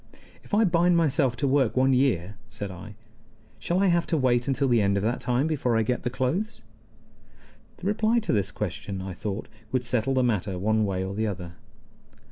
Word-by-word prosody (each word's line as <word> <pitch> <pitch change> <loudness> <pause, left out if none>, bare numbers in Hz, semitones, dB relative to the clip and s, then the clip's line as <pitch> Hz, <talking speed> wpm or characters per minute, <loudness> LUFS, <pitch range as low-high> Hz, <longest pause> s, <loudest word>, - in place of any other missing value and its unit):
"If - - -3
I 220 - +4
bind 175 -2 +3
myself 140 -6 +2
to 140 - -1
work 130 -3 +2
one 130 +1 +4
year," 105 -8 +1
said 105 -3 -6
I, 95 +4 -10 0.6
"shall 175 - -1
I 200 - +3
have 170 -2 +2
to 165 - +1
wait 120 -3 +2
until 135 0 +1
the 120 -3 +3
end 100 0 +2
of 100 - -1
that 115 +3 -1
time 125 +3 +1
before 135 -7 0
I 115 - +2
get 125 +3 -1
the - - -2
clothes?" 160 - -2 1.1
The - - -11
reply 215 +3 +2
to 220 - -1
this 100 -3 +1
question, 100 -1 -4
I 95 0 -5
thought, 105 +3 -5 0.2
would 130 -1 0
settle 125 +2 +1
the 130 - +3
matter 100 -5 0
one 110 +3 +1
way 95 -2 -1
or 95 +1 -4
the 110 +2 -1
other. 90 -4 -5
125 Hz, 205 wpm, -26 LUFS, 105-140 Hz, 1.1 s, I